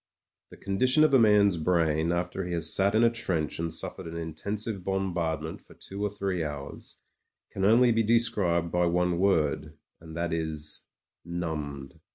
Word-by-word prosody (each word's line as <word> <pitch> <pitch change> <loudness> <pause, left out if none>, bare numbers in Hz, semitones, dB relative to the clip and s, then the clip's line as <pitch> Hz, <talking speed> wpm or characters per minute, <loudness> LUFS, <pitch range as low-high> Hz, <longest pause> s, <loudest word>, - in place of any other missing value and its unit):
The - - -14
condition 130 +9 +2
of 155 -2 +3
a 135 - +7
man's 105 -4 +4
brain 80 -1 +1
after 90 +2 -2
he 90 0 -4
has 85 -1 +2
sat 100 +2 +3
in 110 - +4
a 115 - +5
trench 85 -11 -2
and 85 0 -2
suffered 85 +2 -4
an 85 0 -6
intensive 100 +5 -3
bombardment 85 -5 -2
for - - -19
two 100 +1 -8
or 105 - +1
three 95 -4 -2
hours 70 -2 -7 0.5
can 95 - -4
only 120 +4 +5
be 115 0 +2
described 100 -7 +2
by 90 0 +2
one 90 0 +1
word, 90 -6 0 0.2
and 80 0 -10
that 85 0 -2
is 80 -2 -3 0.2
— - - -65
^numbed. 75 -5 -5
90 Hz, 175 wpm, -27 LUFS, 80-100 Hz, 0.5 s, a